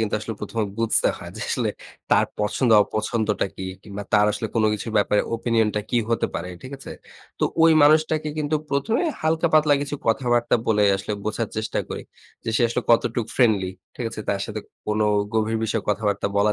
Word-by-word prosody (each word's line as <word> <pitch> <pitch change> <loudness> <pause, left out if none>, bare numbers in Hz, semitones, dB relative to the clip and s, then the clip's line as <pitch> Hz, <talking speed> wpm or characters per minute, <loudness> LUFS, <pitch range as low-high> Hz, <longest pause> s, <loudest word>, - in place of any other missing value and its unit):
কিন্তু 110 -2 0
আসলে 115 +1 -5
১ম 105 +2 -5
এ - - -3
বুঝতে 115 -1 +3
হয়, - - -9
যে - - -7
আসলে - - 0 0.4
তার - - +5 0.2
পছন্দ 115 +4 +1
অপছন্দটা 110 -1 -1
কি? 95 - -5 0.2
কিংবা 100 -1 -7
তার 105 0 +5
আসলে 110 +2 -3
কোন 110 -1 +2
কিছুর 110 +1 -4
ব্যাপারে 105 0 +3
opinion 115 -1 +1
টা 105 - +1
কি 120 - +3
হতে 115 - +1
পারে। 90 - -3
ঠিক 130 - -9
আছে? - - -9 0.5
তো - - +4 0.2
ওই 165 0 +7
মানুষটাকে 155 +1 +4
কিন্তু 155 +1 0
১ম 140 +11 0
এ - - +1 0.2
হালকা-পাতলা 155 -2 +3
কিছু 145 +1 -4
কথাবার্তা 120 0 +2
বলে, 105 -2 +3
আসলে 100 +2 -4
বোঝার 110 +1 -2
চেষ্টা 110 - -2
করি। - - -5 0.4
যে 115 - -1
সে - - +2
আসলে 125 +1 -2
কতটুকু 115 0 +2
ফ্রেন্ডলি। 105 -7 +3 0.2
ঠিক 125 - -5
আছে? - - -6
তার 100 -1 0
সাথে 110 -1 -5 0.3
কোন 105 0 0 0.3
গভীর 110 0 +1
বিষয়ে 110 -1 -1
কথাবার্তা 105 -1 0
বলা 105 +1 +3
115 Hz, 190 wpm, -23 LUFS, 105-125 Hz, 0.5 s, ওই